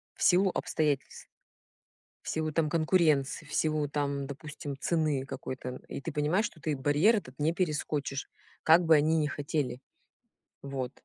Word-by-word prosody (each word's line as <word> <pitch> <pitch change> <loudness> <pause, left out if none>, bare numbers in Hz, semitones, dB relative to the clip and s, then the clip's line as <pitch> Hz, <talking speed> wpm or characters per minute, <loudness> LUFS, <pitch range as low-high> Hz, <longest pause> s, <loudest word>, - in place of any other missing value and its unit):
в - - -4
силу 190 +1 +5
обстоятельств, 150 -3 -1 0.9
в - - -7
силу 155 -1 -1
там 160 -2 +1
конкуренции, 155 -4 +2
в 145 - -11
силу 155 -2 +1
там, 140 -1 -1
допустим, 140 0 -7
цены 155 -5 0
какой-то. 130 -1 -6
И - - -5
ты 160 +2 -6
понимаешь, 155 +8 +1
что 155 - -8
ты 150 -3 -1
барьер 150 - +4
этот 130 -9 -7
не 150 +2 +2
перескочишь, 150 -5 -2 0.3
как 165 +2 +6
бы 160 - +6
они 155 +2 +3
не 150 - +2
хотели. 145 -4 -2 0.8
Вот. 135 -2 -4
150 Hz, 150 wpm, -30 LUFS, 140-160 Hz, 0.9 s, как